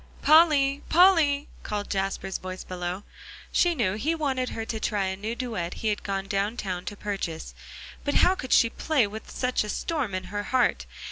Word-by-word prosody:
"Polly 290 -3 +5
Polly!" 320 -5 +5
called 205 -1 -4
Jasper's 195 -1 -2
voice 185 0 -6
below. 180 +1 -4 0.5
She 350 -1 +3
knew 210 -9 +1
he 295 +11 -1
wanted 265 -5 -1
her 225 - -4
to 225 -1 -4
try 205 -2 0
a 190 0 -2
new 215 +4 -4
duet 220 -9 -4
he 220 - -1
had 210 - -1
gone 195 -1 -3
down 200 +3 -1
town 185 -4 -4
to 205 - -5
purchase; 195 -6 -4 0.5
but 285 - -1
how 365 - +5
could 260 -9 -7
she 230 - +6
play 300 -8 +1
with 215 +2 -8
such 250 -2 0
a 210 - -6
storm 265 - -2
in 185 - -3
her 205 - -1
heart? 255 -2 +1
220 Hz, 190 wpm, -26 LUFS, 195-280 Hz, 0.5 s, she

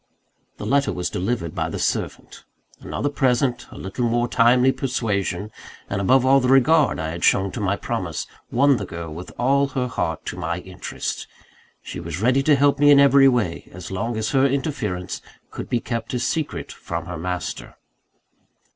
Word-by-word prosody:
The - - -6
letter 140 0 +2
was 90 -1 -3
delivered 90 -3 -2
by 80 -3 -2
the - - -4
servant. - - -3 0.4
Another 145 - -3
present, 130 -3 +1
a - - -12
little 100 +6 -3
more 120 +1 +1
timely 125 +2 +4
persuasion, 105 -7 -2 0.4
and 100 0 -1
above 130 +6 +4
all, 135 +1 +6
the 125 - 0
regard 135 +4 +4
I 80 0 -2
had 85 +1 -6
shown 95 0 +3
to - - -6
my 100 -1 +1
promise, - - -3 0.2
won 140 +2 +4
the 100 - -4
girl 85 -2 -6
with 90 +3 -8
all 140 +3 +3
her 130 -2 -2
heart 80 -10 -3
to - - -4
my 85 -1 -2
interests. 95 0 -5 0.6
She - - -7
was 85 0 -5
ready 125 +5 +3
to 145 +1 +4
help 140 +1 +3
me 145 0 +6
in 145 -1 +8
every 140 -1 +7
way, 115 -10 0
as 90 +1 -9
long 110 +4 -2
as 110 0 -1
her 135 -1 +3
interference 125 - -3 0.3
could - - -7
be 120 - +1
kept 115 +1 -4
a - - 0
secret 145 +6 -2
from - - -5
her - - -6
master. 90 +1 -4
120 Hz, 180 wpm, -22 LUFS, 95-135 Hz, 0.6 s, in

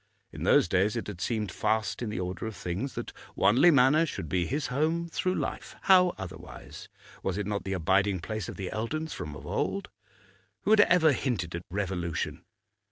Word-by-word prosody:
In - - -6
those - - +5
days 95 +5 +2
it 115 - -3
had 100 -4 -7
seemed 110 -5 -1
fast 110 +5 -1
in 120 - -2
the 105 - -3
order 90 +3 -4
of 110 - -6
things 90 +9 -4
that - - -5 0.2
Wanley 130 +11 +5
Manor 150 +2 +5
should 80 - -5
be 85 +2 0
his 145 +2 -1
home 160 +4 +1
through 185 +2 -1
life; - - -4
how 180 -2 +5
otherwise? 95 -2 -9 0.3
Was 95 0 -2
it 105 - -2
not 105 0 -3
the 95 - -2
abiding 95 +2 +2
place 110 +3 -4
of - - -6
the 95 -2 -5
Eldons 155 +9 -3
from 75 -1 -6
of - - -10
old? - - -2 0.7
Who 210 - +1
had 215 -1 +8
ever 170 -5 +5
hinted 105 -11 -2
at 85 - -4
revolution? 90 -3 -3
105 Hz, 190 wpm, -28 LUFS, 95-145 Hz, 0.7 s, had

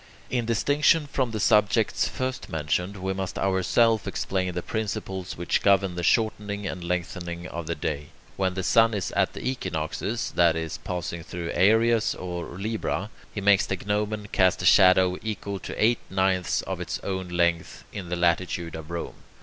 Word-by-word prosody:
In 120 -2 0
distinction 145 +7 +3
from 135 -3 -1
the 110 -1 -4
subjects 105 +1 +3
first 130 0 -4
mentioned, 90 +5 -1
we 95 0 -2
must 95 -1 -4
ourselves 100 +4 +2
explain 95 -1 -1
the 90 0 -4
principles 95 -4 -4
which 85 0 0
govern 100 -2 +3
the 90 - -4
shortening 105 0 0
and 90 -2 -4
lengthening 85 0 -3
of 85 -2 -6
the 85 - -1
day. 75 -1 -3 0.3
When 95 -1 0
the 95 - -2
sun 115 +3 +4
is 100 - -2
at - - +1
the - - -5
equinoxes, 105 0 -2
that 85 -2 +4
is, 80 -1 -4
passing 85 -2 -4
through 85 0 -5
Aries 110 +4 +3
or 90 -1 -5
Libra, 105 -1 -2 0.2
he 100 - -5
makes 100 0 +4
the 95 - -1
gnomon 105 0 -1
cast 95 -1 +3
a - - -1
shadow 90 0 +6
equal 100 -2 -4
to - - -7
eight 115 +2 +3
ninths 95 -1 +1
of - - -4
its - - -3
own 95 -1 -3
length, 85 -1 0
in 90 -3 -6
the 90 - -1
latitude 85 -1 0
of 80 0 -8
Rome. 85 -1 -5
95 Hz, 175 wpm, -26 LUFS, 85-105 Hz, 0.3 s, shadow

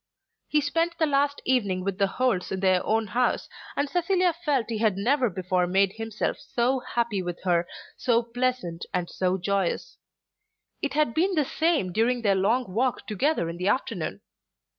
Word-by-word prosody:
He 300 - +2
spent 330 +4 0
the 320 - +3
last 285 -1 +1
evening 200 -8 +1
with 195 0 -3
the 200 - +4
Holts 230 -3 0
in 190 - -2
their 185 -2 +3
own 220 +1 +1
house, 245 +4 0 0.3
and 285 - 0
Cecilia 360 +2 +2
felt 295 -7 0
that 235 - -4
he 220 - -2
had 215 -4 +2
never 250 +4 +2
before 180 -1 0
made 195 +1 +2
himself 225 -1 -3
so 255 +2 0
happy 235 -5 -1
with 175 -1 -5
her, 175 -2 +2 0.3
so 240 -1 +2
pleasant, 240 -7 -2
and 180 -1 -1
so 185 0 0
joyous. 195 - -1 0.8
It 285 - -2
had 300 -6 +2
been 365 +6 +1
the 300 -3 +2
same 315 - +1
during 235 +5 +1
their 200 -2 +4
long 215 +7 +2
walk 250 +4 0
together 215 - 0
in 170 +1 -5
the 180 +2 -2
afternoon. 255 - -1
230 Hz, 180 wpm, -26 LUFS, 190-280 Hz, 0.8 s, the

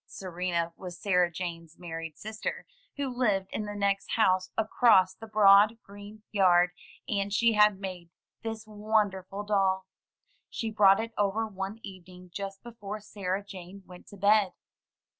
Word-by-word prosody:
Serena 175 -2 -3
was 180 -2 -8
Sarah 180 -3 +2
Jane's 170 -2 -6
married 165 -2 -7
sister, 220 +1 -5 0.3
who 280 -1 -1
lived 200 -6 0
in 215 - -3
the 205 0 -6
next 200 -1 -1
house 185 -4 +2
across 215 -4 +4
the 225 +3 -11
broad, 210 +1 +6
green 205 +2 -12
yard, 180 -3 +4 0.4
and 200 -1 -1
she 230 +3 +3
had 210 -2 +4
made 185 -3 -7 0.3
this 225 -1 -5
won 215 -1 +1
derful 190 +2 -7
doll. 195 -2 +1 0.6
She 225 -1 -4
brought 200 -2 +5
it 225 +1 -4
over 205 +2 +1
one 195 +1 -6
evening 180 -2 -12
just 195 0 -6
before 215 -3 -7
Sarah 200 -2 -4
Jane 190 0 -10
went 180 -1 -14
to 200 - -13
bed. 200 0 +3
200 Hz, 150 wpm, -28 LUFS, 185-215 Hz, 0.6 s, broad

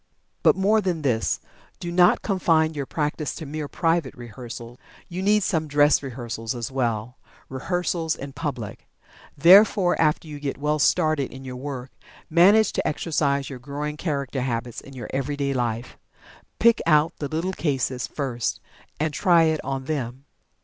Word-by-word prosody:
But, - - +5
more 210 +3 +3
than 175 -5 -2
this. 115 -5 +1 0.4
Do 175 - -5
not 180 0 +4
confine 165 -5 +2
your 140 -3 -4
practice 150 0 -2
to 160 - -7
mere 150 +1 -4
private 165 -3 0
rehearsal. 120 0 -9 0.3
You 180 +1 -5
need 210 +1 +3
some 160 -3 0
"dress 145 0 +4
rehearsals" 120 -3 -5
as 120 +1 -4
well 120 -2 -2 0.3
rehearsals 165 +3 -1
in 140 0 -8
public. 130 -7 -5 0.5
Therefore, 185 +3 +6
after 155 +1 +1
you 150 -1 -7
get 140 -1 -3
well 150 +2 0
started 155 -1 +2
in 135 0 -10
your 130 -1 -6
work, 130 -1 -6 0.4
manage 195 +6 +5
to - - -1
exercise 140 -3 0
your 130 -3 -7
growing 145 +3 -4
character 140 -5 -2
habits 120 -2 -3
in 135 - -13
your 120 -4 -7
everyday 140 +1 -1
life. 120 -1 -3 0.6
Pick 235 0 +4
out 155 0 +4
the 145 - -2
little 165 +5 -2
cases 130 -6 -1
first 125 -5 -3 0.4
and 155 0 0
"try 170 0 +4
it 160 -1 +1
on 135 -1 -3
them." 130 -2 -4
145 Hz, 155 wpm, -24 LUFS, 130-165 Hz, 0.6 s, Therefore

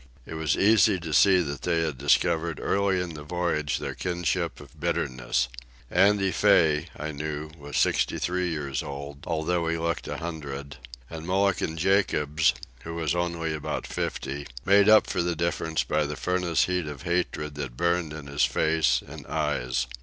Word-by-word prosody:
It - - -8
was 80 -2 0
easy 105 -2 +5
to 80 -2 -5
see 95 +1 +6
that 70 -4 -4
they 85 -2 +1
had 75 -6 -2
discovered 80 +3 +2
early 100 -1 +1
in 90 -2 -3
the 75 - -8
voyage 75 -2 -1
their - - -4
kinship 90 -1 -2
of 70 -4 -15
bitterness. - - 0 0.4
Andy 95 +1 +4
Fay, 80 -7 +3
I 75 +1 -4
knew, 75 +1 -5
was 75 -3 -6
sixty - - +2
three 90 0 -1
years 70 -5 -2
old, 70 0 -7
although 85 +1 0
he 85 0 0
looked 85 0 -2
a - - -4
hundred; 70 -4 -6 0.3
and 80 +2 -8
Mulligan 95 -3 +1
Jacobs, 80 -4 +2 0.3
who 85 0 -6
was 80 -2 0
only 85 -2 -1
about 75 - -4
fifty, 70 +2 -4 0.2
made 100 +1 +6
up 110 0 +7
for - - -1
the 85 0 -1
difference 80 -1 -1
by 75 -1 0
the 75 - -4
furnace 90 -1 +1
heat 90 -3 -1
of 75 0 -7
hatred 85 -4 -1
that 70 -4 -6
burned 85 -2 +1
in 75 -2 -7
his 70 +1 0
face 80 0 +2
and - - -10
eyes. 65 -5 -1
80 Hz, 170 wpm, -26 LUFS, 75-90 Hz, 0.4 s, up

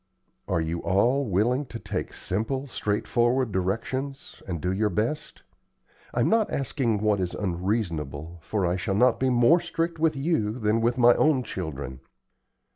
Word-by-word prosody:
"Are - - +1
you 80 +1 -2
all 120 +8 +2
willing 120 +8 +1
to 120 - -7
take - - -4
simple, 115 +8 -2
straightforward 120 +1 0
directions, 115 +9 -3
and 85 -3 -3
do 90 +4 -1
your 105 +2 +1
best? 110 - -3 0.7
I'm - - +1
not 225 -2 +3
asking 125 -6 -1
what 105 -2 +2
is 90 -2 -2
unreasonable, 85 - -2
for 100 +1 -1
I 90 +1 +1
shall 95 +1 -2
not 125 +5 +4
be 130 - +2
more 125 +8 +5
strict 165 -1 -3
with 160 -1 +2
you 135 -7 0
than 110 -1 +1
with 120 +2 +1
my 120 -1 +7
own 150 -5 +3
children." 70 - -5
110 Hz, 155 wpm, -26 LUFS, 95-130 Hz, 0.7 s, my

